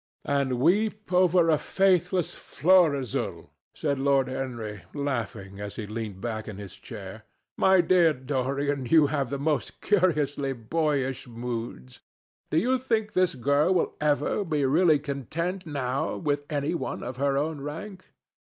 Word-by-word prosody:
"And 140 -3 0
weep 210 - +1
over 180 -2 +4
a 155 - +3
faithless 180 0 +1
Florizel," 155 - +1 0.2
said 140 -3 -1
Lord 135 -1 +2
Henry, 120 -6 -5
laughing, 115 -8 -3
as 100 0 -6
he 110 - -5
leaned 105 -2 -5
back 110 -1 -4
in 105 -3 -7
his 100 -2 -9
chair. 100 0 -9 0.3
"My 190 -1 +5
dear 175 -1 +4
Dorian, 135 0 -2
you 155 +3 +6
have 140 -4 0
the 140 - -2
most 150 +1 -1
curiously 150 -8 +1
boyish 135 +1 -1
moods. 115 - -6 0.5
Do 155 - 0
you 255 +9 +2
think 225 -4 -1
this 185 -5 +2
girl 140 +8 +2
will 175 - +1
ever 150 +6 +1
be 150 -6 0
really 155 +3 +4
content 160 +6 -4
now 140 +1 -2
with 145 -1 -2
any 145 +2 -1
one 170 - -4
of 125 +1 -6
her 140 0 +1
own 150 0 -2
rank? 185 +7 -7
145 Hz, 145 wpm, -27 LUFS, 125-170 Hz, 0.5 s, you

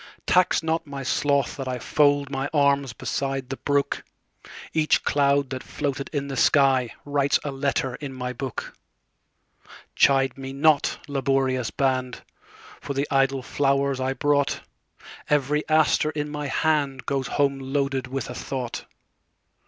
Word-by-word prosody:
Tax 180 -2 +3
not 160 0 -1
my 140 -1 -6
sloth 140 +1 +1
that 135 -2 -5
IFold 140 +3 +1
my 135 +1 -2
arms 140 -2 +3
beside 135 +1 -3
the 135 - -4
brook; 145 -1 0 0.7
Each 155 -1 +2
cloud 140 -1 +2
that 130 -1 -4
floated 140 -1 -4
in 140 -2 -2
the 140 - -5
skyWrites 140 +1 +2
a 145 - -3
letter 135 -2 -1
in 140 +1 -6
my 125 -1 -4
book. 130 0 -5 1.2
Chide 135 -1 +3
me 135 0 -6
not, 150 +1 +3
laborious 135 -3 0
band, 130 -2 -1 0.6
For 140 - -5
the 140 +2 0
idle 135 -1 +2
flowers 140 0 +1
I 130 +1 0
brought; 145 0 +1 0.7
Every 150 0 +2
aster 155 -1 +3
in 150 -1 -3
my 150 -1 -4
handGoes 140 -2 0
home 140 -1 +1
loaded 135 -1 -1
with 135 0 -4
a 125 - -6
thought. 125 -1 -5
140 Hz, 135 wpm, -24 LUFS, 135-145 Hz, 1.2 s, Tax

